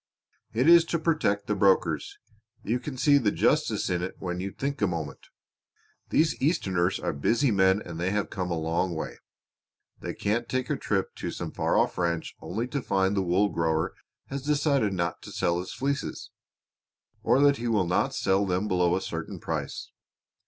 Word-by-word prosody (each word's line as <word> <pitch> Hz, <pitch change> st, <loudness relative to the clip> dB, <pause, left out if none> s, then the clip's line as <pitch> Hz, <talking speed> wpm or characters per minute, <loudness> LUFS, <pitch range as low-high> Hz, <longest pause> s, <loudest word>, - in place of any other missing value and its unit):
"It 125 Hz, +6 st, +1 dB
is 170 Hz, 0 st, +8 dB
to 170 Hz, -, -1 dB
protect 155 Hz, -11 st, +1 dB
the 105 Hz, -, 0 dB
brokers. 95 Hz, -1 st, +2 dB, 0.5 s
You 115 Hz, +5 st, 0 dB
can 130 Hz, 0 st, -6 dB
see 145 Hz, +2 st, +5 dB
the 115 Hz, -6 st, +2 dB
justice -, -, +1 dB
in 90 Hz, -1 st, 0 dB
it 95 Hz, -, -4 dB
when 90 Hz, -1 st, -4 dB
you 95 Hz, +2 st, -3 dB
think 140 Hz, +3 st, -4 dB
a 105 Hz, -, +4 dB
moment. 80 Hz, -5 st, -5 dB, 0.8 s
These 155 Hz, 0 st, +2 dB
Easterners 95 Hz, -, +1 dB
are -, -, -2 dB
busy 115 Hz, -, +2 dB
men 95 Hz, 0 st, +3 dB
and 85 Hz, -1 st, -7 dB
they 90 Hz, +2 st, 0 dB, 0.2 s
come 90 Hz, -1 st, -4 dB
a 85 Hz, -, -1 dB
long 85 Hz, +2 st, -1 dB
way. 80 Hz, -, -5 dB, 0.8 s
They -, -, -5 dB
can't 115 Hz, +4 st, -1 dB
take 130 Hz, +3 st, -1 dB
a -, -, +2 dB
trip 95 Hz, -7 st, -1 dB
to -, -, -4 dB
some -, -, -5 dB
far -, -, 0 dB
off -, -, +1 dB
ranch 85 Hz, -2 st, -1 dB
only 115 Hz, +7 st, -3 dB
to 140 Hz, +1 st, -2 dB
find 95 Hz, -3 st, +1 dB
the 100 Hz, -, +2 dB
wool 95 Hz, +3 st, +2 dB
grower 80 Hz, -3 st, 0 dB, 0.3 s
has 140 Hz, 0 st, -5 dB
decided 140 Hz, -6 st, +1 dB
not 85 Hz, -2 st, -2 dB
to -, -, -10 dB
sell 85 Hz, 0 st, 0 dB
his 90 Hz, -, -6 dB
fleeces; 140 Hz, +1 st, -3 dB, 0.9 s
or -, -, +3 dB
that 140 Hz, -1 st, +5 dB
he 120 Hz, -, -3 dB
will 105 Hz, -5 st, +2 dB
not 90 Hz, -, 0 dB
sell 95 Hz, +1 st, +1 dB
them 95 Hz, +3 st, 0 dB
below 90 Hz, -2 st, +2 dB
a 95 Hz, -, -1 dB
certain -, -, -5 dB
price. -, -, -4 dB
100 Hz, 185 wpm, -27 LUFS, 90-130 Hz, 0.9 s, is